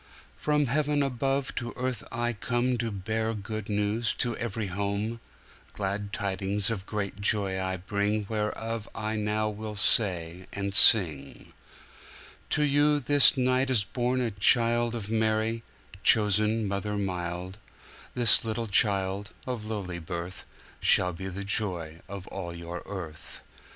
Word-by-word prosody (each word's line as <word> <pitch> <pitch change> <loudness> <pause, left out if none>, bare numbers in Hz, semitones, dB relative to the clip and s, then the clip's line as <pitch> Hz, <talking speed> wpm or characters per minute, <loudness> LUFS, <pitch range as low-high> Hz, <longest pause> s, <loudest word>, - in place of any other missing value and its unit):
From 150 -1 +1
Heaven 145 +2 +1
above 135 +1 -1
to 120 -2 -4
earth 125 -3 -3
I 120 +1 -1
comeTo 120 +1 -1
bear 110 +2 -1
good 110 +1 -6
news 105 +2 0
to 120 -2 -1
every 115 -2 -3
home; 100 +4 -3 0.5
Glad 100 0 -3
tidings 100 +1 +1
of 100 -3 -5
great 100 -1 -4
joy 100 -2 +1
I 95 0 -2
bringWhereof 105 +3 -2
I 110 +2 -3
now 105 0 -1
will 105 0 -6
say 90 -4 +3
and 100 -1 -4
sing:To 85 - +1
you 145 +1 +3
this 140 -2 +5
night 130 +1 +1
is 120 -5 +3
born 125 +4 -1
a 120 -2 -1
childOf 115 +1 +2
Mary, 110 +1 0 0.4
chosen 105 +1 +3
mother 100 +1 -3
mild; 90 0 -4 0.6
This 120 -3 +6
little 115 +1 -2
child, 100 -1 +2 0.2
of 120 -4 -5
lowly 95 -5 -4
birth, 85 +2 -7 0.3
Shall 90 -1 +3
be 95 +3 -7
the 95 +1 -6
joy 90 -6 -2
of 100 -1 -7
all 85 -3 -6
your 85 +1 -7
earth.' 80 -6 -8
105 Hz, 130 wpm, -27 LUFS, 95-115 Hz, 0.6 s, This